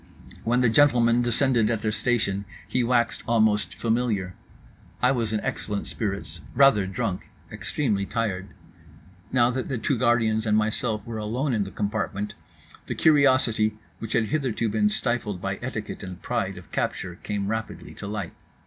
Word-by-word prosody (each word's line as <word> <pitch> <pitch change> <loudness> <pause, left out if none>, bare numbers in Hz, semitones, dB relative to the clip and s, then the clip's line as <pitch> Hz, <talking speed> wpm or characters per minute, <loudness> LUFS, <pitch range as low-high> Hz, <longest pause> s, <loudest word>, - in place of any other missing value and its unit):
When 120 +2 +2
the 125 - +4
gentlemen 120 -2 +4
descended 120 -2 +2
at 115 -2 -1
their 110 - +1
station 105 -4 0 0.2
he 125 - +1
waxed 120 -1 +1
almost 110 -2 +2
familiar. 110 -5 0 0.7
I 125 - +4
was 115 -5 0
in 110 - 0
excellent 105 -1 -3
spirits; 100 -6 -4
rather 120 -7 +5
drunk; 95 -1 -3 0.2
extremely 105 -9 -1
tired. 100 -3 -2 0.8
Now 125 -1 +4
that 130 +1 -3
the 135 - -1
two 120 +2 0
guardians 115 -3 +2
and 105 0 +4
myself 110 +1 0
were 115 -2 -5
alone 125 +6 -1
in 105 -3 +1
the - - -6
compartment, 105 0 -2 0.5
the - - -3
curiosity 130 -8 +4 0.2
which 115 -1 -4
had 110 -2 +2
hitherto 130 -7 0
been 105 0 +2
stifled 105 -4 -1
by 95 +1 -3
etiquette 115 -4 -5
and 90 -2 -7
pride - - -2
of - - -13
capture 90 -1 -2
came 100 -1 -2
rapidly 110 +2 -4
to - - -7
light. 100 -4 -4
110 Hz, 160 wpm, -25 LUFS, 105-120 Hz, 0.8 s, rather